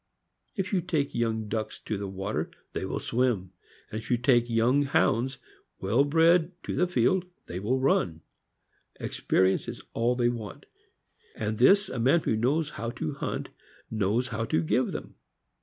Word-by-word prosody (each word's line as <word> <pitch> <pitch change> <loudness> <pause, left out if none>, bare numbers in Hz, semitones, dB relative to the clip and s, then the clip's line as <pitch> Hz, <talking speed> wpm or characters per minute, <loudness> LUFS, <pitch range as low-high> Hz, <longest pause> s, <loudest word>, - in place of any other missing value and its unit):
If 200 -1 -2
you 185 - +3
take 160 -5 -1
young 110 -2 -1
ducks 110 0 -3
to 110 - -3
the 100 0 -4
water, 95 +2 -3 0.2
they - - -2
will - - -3
swim; 115 -7 0 0.4
and 110 - -3
if - - -13
you 120 - +3
take 120 -1 +3
young 120 +5 +3
hounds, 135 -2 +1 0.4
well 110 +8 +3
bred, 165 +3 +4
to - - -3
the 180 - +2
field, 175 +5 +2 0.2
they 90 - -5
will 115 +7 0
run. 90 -11 +1 0.8
Experience 95 +1 +1
is - - -7
all 120 +2 +1
they 120 -1 +2
want; 110 -6 -6 0.7
and 110 0 -3
this 195 +11 +6
a 125 - -4
man 135 +8 +4
who 110 - 0
knows 145 +8 +1
how 115 +2 -4
to 80 -9 -4
hunt - - -4 0.4
knows 110 +4 0
how 115 0 -2
to 85 -6 +1
give 80 - +1
them. - - -6
120 Hz, 170 wpm, -28 LUFS, 110-140 Hz, 0.8 s, this